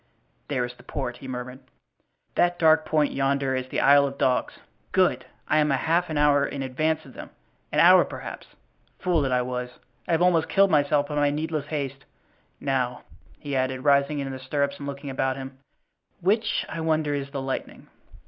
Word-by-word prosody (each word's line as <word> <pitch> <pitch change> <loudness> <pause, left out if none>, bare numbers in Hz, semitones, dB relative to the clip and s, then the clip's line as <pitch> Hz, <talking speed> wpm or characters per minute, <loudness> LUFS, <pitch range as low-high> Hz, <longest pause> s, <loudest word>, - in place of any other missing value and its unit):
"There 130 -4 -1
is 120 - -8
the - - -18
port," 125 -4 -5
he 130 - -10
murmured. 125 0 -6 0.7
"That 175 0 +2
dark 160 -1 +4
point 150 -2 +2
yonder 135 -1 0
is 130 0 -3
the - - -2
Isle 140 0 +6
of 140 0 -7
Dogs. 125 -1 +1 0.4
Good! - - +2 0.2
I 155 - +3
am 150 0 +2
half 165 +6 +1
an 155 - -2
hour 145 -1 +4
in 140 -1 -3
advance 155 +5 -1
of 130 - -14
them, - - -9 0.4
an - - +1
hour, - - +8
perhaps. - - -8 0.5
Fool 175 -4 +1
that 135 -2 -1
I 125 0 +2
was! 125 0 -4 0.4
I 170 - 0
have 165 +2 +3
almost 170 -3 +3
killed 195 0 +4
myself 145 -1 +2
by - - -4
my 145 0 +3
needless 155 0 -3
haste. 140 -3 -4 0.5
Now," 130 -3 -1 0.3
he 145 -2 -5
added, 130 0 -1
rising 140 +1 +3
in 135 -1 -3
the 130 - -6
stirrups 140 +2 -2
and 140 - -6
looking 140 0 -6
about 130 0 -1
him, 135 0 -8 0.6
"which, 210 +5 +1
I 165 - -5
wonder, 155 -2 0
is 140 -1 -3
the 140 - -5
Lightning?" 135 0 -5
140 Hz, 190 wpm, -25 LUFS, 130-155 Hz, 0.7 s, hour